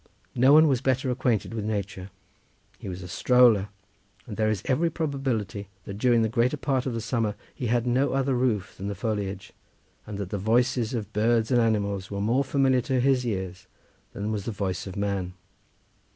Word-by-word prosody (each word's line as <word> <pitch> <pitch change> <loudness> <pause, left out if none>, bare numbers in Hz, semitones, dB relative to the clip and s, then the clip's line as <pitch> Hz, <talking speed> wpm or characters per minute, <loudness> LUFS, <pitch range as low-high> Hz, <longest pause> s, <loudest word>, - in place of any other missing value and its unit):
No 130 +2 +5
one 155 +2 +7
was 130 -4 +1
better 130 0 +1
acquainted 125 -4 0
with 110 -2 -3
nature; 100 -3 -4 0.7
he - - -7
was 90 0 -6
a - - -7
stroller, 115 -1 +4 0.6
and 110 - -7
there 110 0 +1
is 105 -3 -1
every 155 +6 +2
probability 130 - -2 0.2
that 100 0 -7
during 120 -1 +3
the - - +2
greater 120 +5 +1
part 135 -2 -1
of 125 - -2
the - - -2
summer 115 -2 -1 0.2
he 125 - -4
had 120 +1 +1
no 130 +3 +1
other 135 0 +1
roof 120 -7 0
than 95 - -6
the 100 - -3
foliage, 100 -1 -3 0.5
and 105 -2 -5
that 100 -2 -5
the 100 - -2
voices 120 +3 +1
of 110 -2 -5
birds 115 +2 +2
and 120 -2 +4
animals 100 -4 0
were 100 - -4
more 115 +7 +2
familiar 135 -2 +2
to 130 +1 0
his 130 0 +3
ears 95 -4 -4 0.5
than 105 +2 -3
was 105 -2 -3
the 115 - -2
voice 100 -3 -3
of 95 - -7
man. 100 -3 -2
115 Hz, 195 wpm, -26 LUFS, 100-130 Hz, 0.7 s, one